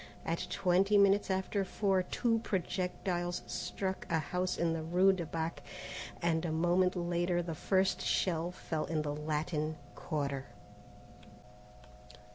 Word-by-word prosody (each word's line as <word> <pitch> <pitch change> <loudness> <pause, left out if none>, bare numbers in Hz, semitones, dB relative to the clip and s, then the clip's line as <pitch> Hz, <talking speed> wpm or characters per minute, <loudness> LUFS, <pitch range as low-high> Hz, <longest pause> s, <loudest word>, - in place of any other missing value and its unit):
At 165 +1 -1
twenty 195 +3 +3
minutes 200 0 +5
after 190 +1 0
four 195 0 +1
two 225 +5 +1
projectiles 180 -3 -2
struck 190 -1 -3
a 165 - +2
house 180 +4 -1
in 170 -1 +1
the 165 - -2
rue 180 +4 +4
de 175 -4 -3
Bac, 165 +1 -3 0.6
and 165 -1 +2
a 170 - -1
moment 175 +3 +3
later 175 0 0
the 165 -1 -4
first 190 +4 +1
shell 170 -2 +1
fell 160 -3 -3
in 155 -2 -1
the 145 -1 -2
Latin 155 +1 -2 0.2
Quarter. 140 -4 -3
175 Hz, 130 wpm, -33 LUFS, 160-190 Hz, 0.6 s, minutes